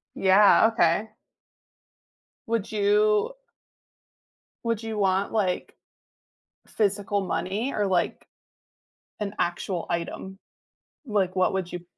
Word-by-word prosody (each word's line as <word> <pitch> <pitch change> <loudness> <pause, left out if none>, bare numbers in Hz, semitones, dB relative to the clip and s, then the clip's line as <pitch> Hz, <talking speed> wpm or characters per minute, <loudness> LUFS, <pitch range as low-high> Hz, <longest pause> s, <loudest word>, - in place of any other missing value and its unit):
Yeah, 200 +3 +5
okay. 205 +1 +2 1.4
Would 225 -3 -2
you 210 - +2 1.3
Would 230 -1 -1
you 220 -1 -4
want, 195 -1 +1
like, 190 -5 -1 0.9
physical 200 -1 0
money, 195 +10 -2
or, 210 - 0
like, 180 -3 0 1.0
an 205 0 -3
actual 175 0 -2
item? 175 +3 -4 0.7
Like, 195 -5 0
what 185 -1 +2
would 190 -2 -2
you 175 -1 -7
200 Hz, 95 wpm, -25 LUFS, 185-210 Hz, 1.4 s, Yeah